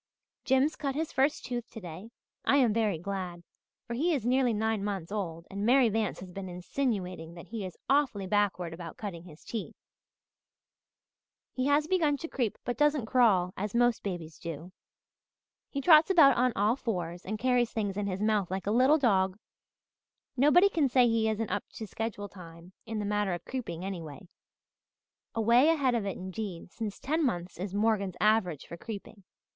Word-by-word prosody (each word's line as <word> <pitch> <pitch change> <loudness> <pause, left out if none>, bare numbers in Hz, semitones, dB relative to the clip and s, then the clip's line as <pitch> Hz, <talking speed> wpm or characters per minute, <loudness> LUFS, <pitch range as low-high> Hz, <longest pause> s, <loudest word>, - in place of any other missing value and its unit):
"Jims 265 +4 +3
cut 275 -2 -3
his 315 +1 -2
first 275 +3 +1
tooth 240 -1 -4
today. 185 -1 -9 0.3
I - - +3
am 245 -6 +4
very 215 -5 +1
glad, 180 -1 -5 0.4
for 235 - -5
he 320 +7 +1
is 245 -6 -3
nearly 255 0 +3
nine 220 -1 0
months 195 -4 -3
old 170 -5 -4
and 200 +1 -4
Mary 250 +1 +5
Vance 220 -2 -1
has 185 -1 -9
been 190 0 -6
insinuating 180 -3 -3
that 170 - -11
he 225 -2 -4
is 185 -2 -7
awfully 270 -8 +2
backward 185 -4 0
about 165 -1 -8
cutting 180 -6 -6
his 160 -3 -14
teeth. 225 -3 -5 1.8
He 255 +1 -1
has 290 +1 +3
begun 315 -5 +2
to 330 - -6
creep 245 -9 -2
but 245 - -2
doesn't 295 -4 +3
crawl 210 -7 +3
as 205 +3 -4
most 240 -1 +3
babies 170 -5 -6
do. 165 +2 -7 1.0
He 280 - -3
trots 310 +3 +7
about 315 -8 +7
on 250 +1 +3
all 210 +4 +2
fours 180 -8 -4
and 215 +3 -4
carries 245 0 +2
things 205 -4 -2
in 205 0 -2
his 195 +1 -2
mouth 210 -4 +1
like 190 +1 -3
a 205 - 0
little 260 +7 +5
dog. 190 -8 +2 1.0
Nobody 300 +9 +6
can 310 -8 +1
say 250 -1 +5
he 225 -1 +2
isn't 220 -1 -2
up 205 +1 -2
to 220 - -6
schedule 215 -1 -4
time 170 -2 -13
in 225 -1 -4
the 210 - -2
matter 205 -2 0
of 175 - -10
creeping 190 -10 -5
anyway 180 -2 -7 1.1
away 235 +6 +5
ahead 280 -6 +2
of 225 -4 -1
it 195 - -3
indeed, 185 -2 -6
since 215 -3 -5
ten 315 +4 -1
months 175 - -2
is 190 +1 -4
Morgan's 205 -3 +1
average 210 -8 +2
for 170 - -9
creeping. 205 -1 -9
215 Hz, 180 wpm, -29 LUFS, 185-250 Hz, 1.8 s, trots